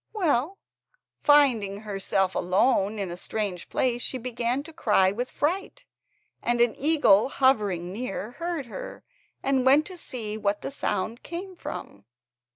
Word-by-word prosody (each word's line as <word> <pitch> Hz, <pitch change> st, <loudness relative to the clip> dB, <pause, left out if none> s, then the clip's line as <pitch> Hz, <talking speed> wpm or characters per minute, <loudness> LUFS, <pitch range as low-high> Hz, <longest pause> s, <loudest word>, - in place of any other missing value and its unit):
Well, 345 Hz, -, +1 dB, 0.6 s
finding 235 Hz, -9 st, +4 dB
herself 195 Hz, -2 st, -1 dB
left -, -, -1 dB
alone 200 Hz, +3 st, +2 dB
in 195 Hz, -4 st, -3 dB
a -, -, -5 dB
strange 200 Hz, -2 st, -3 dB
place 245 Hz, -2 st, 0 dB
she 260 Hz, -, -2 dB
began 245 Hz, +2 st, -2 dB
to 325 Hz, +2 st, -12 dB
cry 210 Hz, -11 st, +3 dB
with 245 Hz, +5 st, -3 dB
fright, 360 Hz, +7 st, -2 dB, 0.6 s
and 240 Hz, 0 st, 0 dB
an 235 Hz, -2 st, +4 dB
eagle 265 Hz, -8 st, +4 dB
hovering 205 Hz, -11 st, +1 dB
near, 215 Hz, -1 st, -4 dB
heard 335 Hz, +1 st, -4 dB
her, 235 Hz, -, -8 dB, 0.4 s
and 265 Hz, -1 st, +2 dB
went 280 Hz, +4 st, +5 dB
to 370 Hz, -2 st, -9 dB
see 220 Hz, -8 st, -5 dB
what 205 Hz, 0 st, -1 dB
the -, -, -3 dB
sound 225 Hz, -2 st, -2 dB
came 370 Hz, +2 st, -7 dB
from. 100 Hz, -, -8 dB
240 Hz, 150 wpm, -26 LUFS, 200-285 Hz, 0.6 s, went